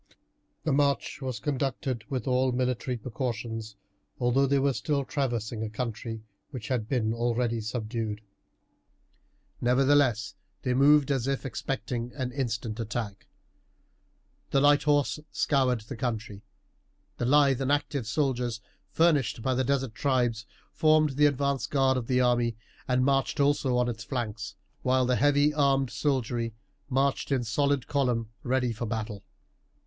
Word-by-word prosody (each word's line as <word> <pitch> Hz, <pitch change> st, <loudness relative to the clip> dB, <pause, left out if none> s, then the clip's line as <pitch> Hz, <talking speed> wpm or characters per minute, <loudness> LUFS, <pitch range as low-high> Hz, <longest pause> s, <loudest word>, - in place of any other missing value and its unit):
The 150 Hz, -2 st, +1 dB
march 140 Hz, 0 st, +1 dB
was 130 Hz, -3 st, -3 dB
conducted 135 Hz, -3 st, -2 dB
with 130 Hz, -4 st, -3 dB
all 130 Hz, 0 st, +2 dB
military 125 Hz, 0 st, -1 dB
precautions, 115 Hz, -2 st, -4 dB, 0.4 s
although 130 Hz, +2 st, +3 dB
they 140 Hz, +1 st, +3 dB
were 135 Hz, 0 st, +2 dB
still 140 Hz, -1 st, -1 dB
traversing 120 Hz, -6 st, -2 dB
a 110 Hz, -, -2 dB
country 115 Hz, -1 st, -5 dB, 0.3 s
which 125 Hz, -7 st, -7 dB
had 120 Hz, -4 st, -1 dB
been 115 Hz, -4 st, +1 dB
already 115 Hz, 0 st, 0 dB
subdued. 110 Hz, -1 st, -3 dB, 1.4 s
Nevertheless 125 Hz, -4 st, +3 dB, 0.3 s
they 125 Hz, -, +1 dB
moved 140 Hz, +2 st, +5 dB
as 135 Hz, -2 st, 0 dB
if 135 Hz, 0 st, -1 dB
expecting 120 Hz, -1 st, -3 dB
an 130 Hz, -3 st, -3 dB
instant 115 Hz, -4 st, -3 dB
attack. 110 Hz, -3 st, -4 dB, 1.2 s
The 135 Hz, -, +3 dB
light 145 Hz, +1 st, +5 dB
horse 145 Hz, 0 st, +2 dB
scoured 130 Hz, -5 st, +1 dB
the 115 Hz, +6 st, -8 dB
country. 110 Hz, -3 st, -4 dB, 0.8 s
The 120 Hz, -, -1 dB
lithe 135 Hz, 0 st, +4 dB
and 135 Hz, +1 st, 0 dB
active 145 Hz, -4 st, 0 dB
soldiers 125 Hz, -3 st, 0 dB, 0.3 s
furnished 150 Hz, -9 st, +2 dB
by 130 Hz, -, +1 dB
the 130 Hz, +1 st, +1 dB
desert 135 Hz, -3 st, 0 dB
tribes 120 Hz, -3 st, 0 dB, 0.3 s
formed 155 Hz, -1 st, +4 dB
the 145 Hz, +2 st, +4 dB
advanced 140 Hz, -1 st, 0 dB
guard 135 Hz, -2 st, +3 dB
of 125 Hz, -3 st, -3 dB
the 125 Hz, 0 st, +2 dB
army, 120 Hz, -2 st, +2 dB, 0.3 s
and 125 Hz, 0 st, +2 dB
marched 135 Hz, 0 st, +1 dB
also 140 Hz, -3 st, +2 dB
on 125 Hz, 0 st, +2 dB
its 115 Hz, -3 st, -4 dB
flanks, 110 Hz, -6 st, -4 dB, 0.3 s
while 130 Hz, 0 st, +2 dB
the 125 Hz, 0 st, +2 dB
heavy 145 Hz, +1 st, +3 dB
armed 135 Hz, -3 st, +2 dB
soldiery 120 Hz, -5 st, -1 dB, 0.3 s
marched 135 Hz, +1 st, 0 dB
in 130 Hz, -3 st, +2 dB
solid 140 Hz, +4 st, +1 dB
column 120 Hz, -6 st, 0 dB
ready 125 Hz, -1 st, 0 dB
for 120 Hz, +1 st, -4 dB
battle. 105 Hz, -2 st, -4 dB
125 Hz, 140 wpm, -28 LUFS, 115-140 Hz, 1.4 s, moved